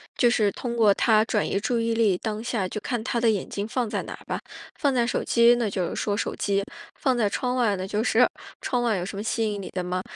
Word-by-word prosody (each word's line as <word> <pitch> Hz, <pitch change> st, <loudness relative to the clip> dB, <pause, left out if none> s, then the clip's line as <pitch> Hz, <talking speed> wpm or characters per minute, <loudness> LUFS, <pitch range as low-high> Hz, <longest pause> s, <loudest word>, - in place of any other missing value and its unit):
就 240 Hz, -, +4 dB
是 215 Hz, -4 st, +2 dB
通 235 Hz, +2 st, -5 dB
过 215 Hz, -3 st, +5 dB
它 215 Hz, +1 st, +3 dB
转 215 Hz, -2 st, 0 dB
移 -, -, 0 dB
注 235 Hz, +3 st, 0 dB
意 230 Hz, 0 st, 0 dB
力。 215 Hz, -5 st, +3 dB
当 215 Hz, -1 st, -3 dB
下 225 Hz, -5 st, -1 dB
就 210 Hz, -, -4 dB
看 240 Hz, -3 st, -3 dB
他 235 Hz, 0 st, -1 dB
的 230 Hz, -1 st, +3 dB
眼 205 Hz, -4 st, -1 dB
睛 200 Hz, +1 st, -3 dB
放 235 Hz, -1 st, -1 dB
在 -, -, -2 dB
哪 -, -, -7 dB
儿 -, -, -12 dB
吧， -, -, -3 dB, 0.4 s
放 280 Hz, -3 st, +2 dB
在 240 Hz, -2 st, +2 dB
手 -, -, -1 dB
机 235 Hz, +1 st, +5 dB
那 240 Hz, -2 st, 0 dB
就 185 Hz, -3 st, -2 dB
是 -, -, -5 dB
说 205 Hz, -, -1 dB
手 205 Hz, -, -2 dB
机， 200 Hz, -1 st, 0 dB, 0.3 s
放 260 Hz, -3 st, 0 dB
在 220 Hz, -3 st, +2 dB
窗 250 Hz, +5 st, -1 dB
外 230 Hz, -5 st, +2 dB
呢， 185 Hz, -, -4 dB
就 210 Hz, +2 st, -1 dB
是 245 Hz, +1 st, +4 dB, 0.4 s
“窗 245 Hz, -2 st, -1 dB
外 230 Hz, -3 st, +2 dB
有 175 Hz, -, -3 dB
什 195 Hz, +1 st, -6 dB
么 205 Hz, -, -3 dB
吸 220 Hz, -1 st, 0 dB
引 205 Hz, -, -4 dB
你 -, -, -7 dB
的 185 Hz, -, -3 dB
吗？” 180 Hz, +1 st, -2 dB
220 Hz, 295 characters per minute, -25 LUFS, 200-240 Hz, 0.4 s, 过